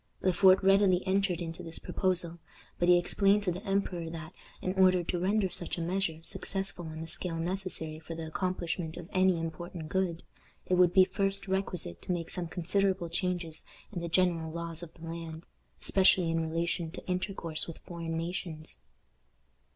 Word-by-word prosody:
Le 185 Hz, -, +3 dB
Fort 190 Hz, +2 st, +6 dB
readily 195 Hz, -1 st, +5 dB
entered 190 Hz, -2 st, +1 dB
into 165 Hz, -1 st, -5 dB
this 165 Hz, 0 st, -6 dB
proposal, 175 Hz, -2 st, 0 dB, 0.4 s
but 175 Hz, -, +3 dB
he 180 Hz, -, +8 dB
explained 195 Hz, +3 st, +3 dB
to 185 Hz, -, +1 dB
the 180 Hz, +4 st, -5 dB
emperor 195 Hz, -5 st, -1 dB
that, 160 Hz, +1 st, -7 dB, 0.3 s
in 185 Hz, -, -1 dB
order 185 Hz, -2 st, +5 dB
to 175 Hz, +1 st, -2 dB
render 195 Hz, +2 st, +2 dB
such 175 Hz, -1 st, -4 dB
a -, -, -2 dB
measure 170 Hz, -2 st, -1 dB
successful 195 Hz, -1 st, -3 dB
on 160 Hz, 0 st, -6 dB
the 165 Hz, -, -5 dB
scale 175 Hz, +1 st, -1 dB
necessary 165 Hz, -3 st, -1 dB
for 165 Hz, +1 st, -7 dB
the 165 Hz, 0 st, -5 dB
accomplishment 170 Hz, -1 st, -2 dB
of 175 Hz, -2 st, -7 dB
any 185 Hz, -2 st, +4 dB
important 165 Hz, 0 st, -5 dB
good, 180 Hz, -3 st, 0 dB, 0.4 s
it -, -, -1 dB
would 180 Hz, -1 st, +6 dB
be 185 Hz, 0 st, +7 dB
first 195 Hz, +1 st, -1 dB
requisite 185 Hz, -, -2 dB
to -, -, -3 dB
make 170 Hz, -2 st, -2 dB
some 180 Hz, -2 st, -2 dB
considerable 185 Hz, +1 st, 0 dB
changes 175 Hz, -2 st, -1 dB, 0.3 s
in 175 Hz, -, -3 dB
the 170 Hz, -, -3 dB
general 165 Hz, -2 st, +2 dB
laws 165 Hz, 0 st, -3 dB
of 170 Hz, -2 st, -8 dB
the 165 Hz, -, -10 dB
land, 165 Hz, 0 st, -6 dB, 0.3 s
especially 185 Hz, -3 st, +4 dB
in 165 Hz, -1 st, 0 dB
relation 170 Hz, 0 st, -1 dB
to 160 Hz, -, -9 dB
intercourse 180 Hz, -3 st, -2 dB
with 165 Hz, -, -7 dB
foreign 165 Hz, -2 st, -5 dB
nations. 165 Hz, -2 st, -4 dB
175 Hz, 175 wpm, -31 LUFS, 165-185 Hz, 0.4 s, he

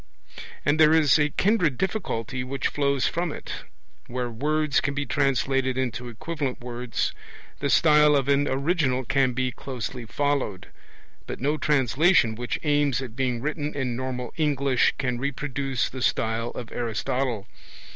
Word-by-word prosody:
And 145 Hz, +3 st, +2 dB
there 155 Hz, 0 st, +7 dB
is 150 Hz, -6 st, +5 dB
a 150 Hz, 0 st, +3 dB
kindred 180 Hz, -, +2 dB
difficulty 135 Hz, -, -2 dB
which 130 Hz, 0 st, -2 dB
flows 140 Hz, -2 st, +1 dB
from 170 Hz, -1 st, -1 dB
it. -, -, -7 dB, 0.5 s
Where 125 Hz, -1 st, -3 dB
words 150 Hz, +4 st, +1 dB
can 140 Hz, -, -2 dB
be 140 Hz, 0 st, -1 dB
translated 135 Hz, -1 st, +1 dB
into 125 Hz, -1 st, -2 dB
equivalent 145 Hz, +2 st, -4 dB
words, 120 Hz, 0 st, -3 dB, 0.5 s
the 140 Hz, -, -1 dB
style 150 Hz, 0 st, +5 dB
of 135 Hz, -1 st, +1 dB
an 140 Hz, 0 st, +3 dB
original 135 Hz, -2 st, 0 dB
can 135 Hz, -1 st, +2 dB
be 130 Hz, +1 st, 0 dB
closely 125 Hz, -1 st, -6 dB
followed; 135 Hz, -7 st, -1 dB, 0.6 s
but -, -, -5 dB
no 145 Hz, +4 st, +1 dB
translation 145 Hz, -2 st, +3 dB
which 120 Hz, +2 st, -3 dB
aims 145 Hz, -4 st, +2 dB
at 120 Hz, -3 st, -8 dB
being 125 Hz, -3 st, -1 dB
written 150 Hz, +1 st, -3 dB
in 130 Hz, -4 st, -1 dB
normal 125 Hz, 0 st, -4 dB
English 140 Hz, -4 st, +2 dB
can 125 Hz, -2 st, -1 dB
reproduce 135 Hz, -1 st, -2 dB
the 130 Hz, -, -7 dB
style 115 Hz, 0 st, 0 dB
of 120 Hz, -, -8 dB
Aristotle. 120 Hz, 0 st, -2 dB
135 Hz, 145 wpm, -25 LUFS, 125-145 Hz, 0.6 s, there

